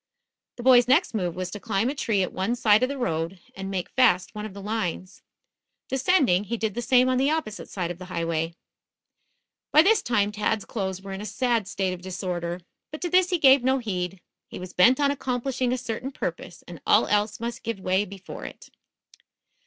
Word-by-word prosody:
The 240 - -8
boy's 245 -1 +6
next 295 +6 +3
move 180 -6 -2
was 185 -1 -4
to 205 - -6
climb 215 0 0
a 270 - 0
tree 220 -8 0
at - - -4
one 195 +6 -1
side 215 -2 +4
of 255 - +2
the 280 - -4
road, 165 -5 -2 0.2
and 195 0 -6
make 190 -2 -3
fast 230 -9 +3
one 210 0 -5
of 195 - -13
the - - -7
lines. 195 -3 -3 0.7
Descending, 265 - +2
he 235 +4 -3
did 220 -2 -2
the 240 - -3
same 250 +1 +4
on 255 0 +2
the 270 +2 +3
opposite 310 -10 -3
side 175 -3 -3
of 175 - -8
the 185 - -8
highway. 165 -2 -2 1.2
By 305 - +7
this 435 +4 +4
time, 210 -3 +1
Tad's 210 0 -1
clothes 190 -3 -4
were 195 - -7
in 195 - -6
a - - -6
sad 240 -4 0
state 190 -2 -1
of 180 - -8
disorder. 180 -1 -4 0.3
But 305 - -7
to 350 -1 -2
this 365 0 +4
he 360 - +1
gave 270 -4 +6
no 260 +1 +3
heed. 185 -6 -3 0.3
He - - -9
was 185 0 -8
bent 245 +9 +5
on 285 -1 +3
accomplishing 255 -2 -2
a 255 - 0
certain 245 +1 -4
purpose, - - -6
and - - -10
all - - +5
else 210 +1 0
must 235 0 -4
give 230 -3 -4
way 190 +1 +1
before 195 -1 -9
it. - - -10
215 Hz, 210 wpm, -25 LUFS, 185-255 Hz, 1.2 s, By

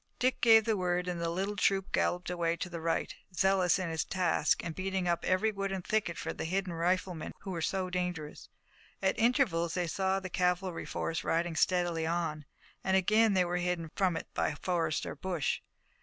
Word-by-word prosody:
Dick 255 +1 +1
gave 225 -2 +7
the 225 -2 +2
word 180 -1 0
and 175 -1 -2
the 170 - 0
little 195 +4 -2
troop 195 0 +1
galloped 180 0 0
away 170 -1 0
to 180 - -4
the 170 -1 -5
right, 165 0 -1 0.2
zealous 190 -2 +3
in 185 -2 -2
its 160 -1 0
task 175 -5 +1
and 170 - -3
beating 190 0 -2
up 170 -1 +1
every 200 +4 +2
wood 195 -1 -3
and 190 -2 -4
thicket 215 -6 0
for - - -3
the - - -5
hidden 185 +1 -1
riflemen 175 0 -1
who 195 - -6
were 170 -2 -3
so 190 +3 -1
dangerous. 180 -4 -4 0.5
At 190 - +3
intervals 220 - +2
they 180 -1 0
saw 190 +3 0
the 190 - -6
cavalry 180 0 0
force 165 - -2
riding 170 0 0
steadily 175 -2 +1
on, 160 -3 -2 0.4
and 190 0 +3
again 215 +2 +4
they 180 -1 +4
were 175 0 -1
hidden 175 -3 -2
from 185 -4 +2
it - - -5
by - - 0
forest 165 -4 -1
or - - -4
bush. 175 -7 -2
180 Hz, 200 wpm, -31 LUFS, 170-190 Hz, 0.5 s, gave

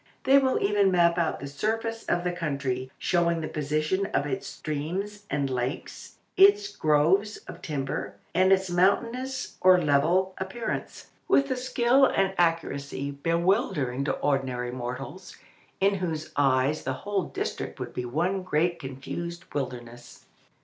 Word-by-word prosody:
They 275 +1 +6
will 260 -1 +1
even 200 -1 +3
map 170 -1 +3
out 165 - 0
the - - -6
surface 225 +10 -2
of 175 0 0
the 180 - 0
country, 140 -6 -3
showing 170 -2 +1
the 155 - -3
position 155 +6 -1
of 140 - 0
its 140 -3 -3
streams 190 +8 -4
and 140 -1 0
lakes, 130 +2 -4 0.2
its 400 +1 +5
groves 165 +8 +2
of 170 - -9
timber, 140 -5 -3 0.2
and 185 +2 +4
its 190 0 +4
mountainous 230 +9 0
or 185 0 +7
level 170 +5 +2
appearance, 190 +5 -5 0.2
with 275 0 +3
a - - +1
skill 255 +1 +3
and 195 0 +1
accuracy 140 -5 0
bewildering 165 - 0
to - - +1
ordinary 130 -4 -1
mortals, 130 +8 -6 0.4
in 195 +1 +3
whose 165 -5 -3
eyes 135 +1 +2
the - - -1
whole 200 -4 0
district - - -4
would - - -5
be 125 - -3
one 175 +10 0
great 170 0 0
confused 155 +6 -6
wilderness. 120 -3 -6
170 Hz, 140 wpm, -27 LUFS, 140-195 Hz, 0.4 s, or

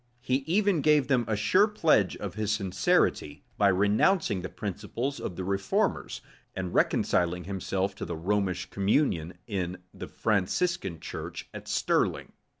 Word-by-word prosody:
He 125 +1 +1
even 195 -1 +2
gave 150 -1 +4
them 125 -4 +2
a 110 - 0
sure 185 - +4
pledge 160 - +2
of 100 -4 -5
his 105 +1 -2
sincerity, 95 -7 +1 0.2
by 100 - +5
renouncing 105 - +2
the 95 - -5
principles 110 +7 -4
of 90 - -5
the 95 - -4
reformers, 95 +1 -1 0.3
and 90 -1 -4
reconciling 90 0 +1
himself 95 +1 -2
to - - -4
the 85 -1 -5
Romish 95 +1 -1
communion 95 - 0
in 95 -5 -3 0.2
the - - -7
Franciscan 100 - -1
church - - -7
at - - -9
Stirling. - - 0
100 Hz, 145 wpm, -28 LUFS, 90-125 Hz, 0.3 s, by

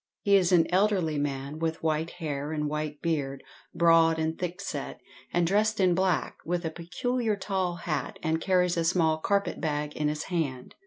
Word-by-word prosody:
He 200 -1 +5
is 190 -2 +4
an 175 -3 +5
elderly 185 -6 +2
man, 140 +1 -3
with 160 -1 -2
white 160 0 0
hair 150 -4 -4
and 150 -1 -1
white 150 0 -4
beard, 140 -5 -1 0.3
broad 165 -1 +5
and 160 0 -1
thick 180 +1 -4
set, 195 - -5 0.3
and 175 0 +2
dressed 215 +4 +2
in 185 -2 +4
black, 180 -6 0
with 175 +1 -2
a 160 - -1
peculiar 215 +8 -1
tall 190 -3 -2
hat, 165 -3 -3
and 160 +1 0
carries 180 -1 +2
a 165 - +2
small 165 -2 +2
carpet 200 +4 0
bag 150 -1 -2
in 150 - 0
his 150 0 -2
hand. 145 -8 -3
165 Hz, 180 wpm, -28 LUFS, 155-185 Hz, 0.3 s, He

